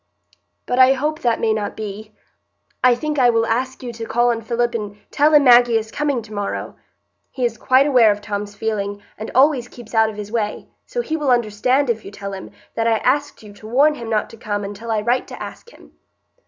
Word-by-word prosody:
"But 250 - -1
I 260 +1 +7
hope 300 +4 -2
that 235 -2 +1
may 220 -1 +1
not 210 -2 -4
be. 215 0 -7 0.7
I 250 -1 +6
think 300 +3 -3
I 245 -2 +5
will 230 -1 +2
ask 255 +4 -2
you 240 -1 -5
to 225 0 -6
call 240 +1 +2
on 230 -1 -3
Philip 235 +1 -1
and 210 -3 -5
tell 295 +2 +3
him 295 -2 +6
Maggie 240 -2 +6
is 220 0 -4
coming 285 -5 -1
to 215 0 -12
morrow. 205 -1 -4 0.5
He 255 -2 -2
is 235 -1 -1
quite 260 +4 +3
aware 250 -7 +5
of 205 - -2
Tom's 205 0 -5
feeling, 205 -2 -3
and 220 - -7
always 265 -2 +4
keeps 240 -2 -13
out 220 -1 +4
of 215 - -8
his 210 0 -7
way; 215 -3 -2 0.2
so 485 - -2
he 320 -9 -3
will 300 -3 -1
understand, 245 +3 +2
if 225 -2 -1
you - - -8
tell 200 0 -7
him, 190 - -8 0.2
that 230 0 0
I 225 -1 +3
asked 285 +2 -1
you 210 -1 -12
to 215 +1 -13
warn 280 +7 +4
him 235 -6 -7
not 215 -2 0
to 230 - -12
come 205 -2 -3
until 205 +3 -7
I 220 -1 +1
write 240 +4 0
to - - -9
ask - - -10
him." - - -18
230 Hz, 230 wpm, -20 LUFS, 215-255 Hz, 0.7 s, I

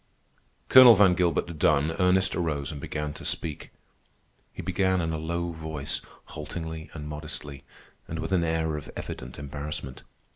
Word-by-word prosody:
Colonel 130 -3 +10
Van 95 -2 +6
Gilbert 85 -2 0
done, 75 +3 +3
Ernest 95 +1 +3
arose 75 -6 -2
and 75 -2 -7
began 75 0 -4
to - - -10
speak. 75 -3 -3 0.8
He - - -8
began 95 -1 +1
in 80 -1 -1
a 80 - -2
low 85 +2 -2
voice, 80 -3 -3 0.3
haltingly 80 +1 -6
and 75 -2 -6
modestly, 75 -2 -6 0.4
and 80 - -5
with 80 +2 -4
an 90 -3 +3
air 80 -1 0
of 75 - -8
evident 60 - -7
embarrassment. 70 -2 -6
80 Hz, 150 wpm, -27 LUFS, 75-85 Hz, 0.8 s, Colonel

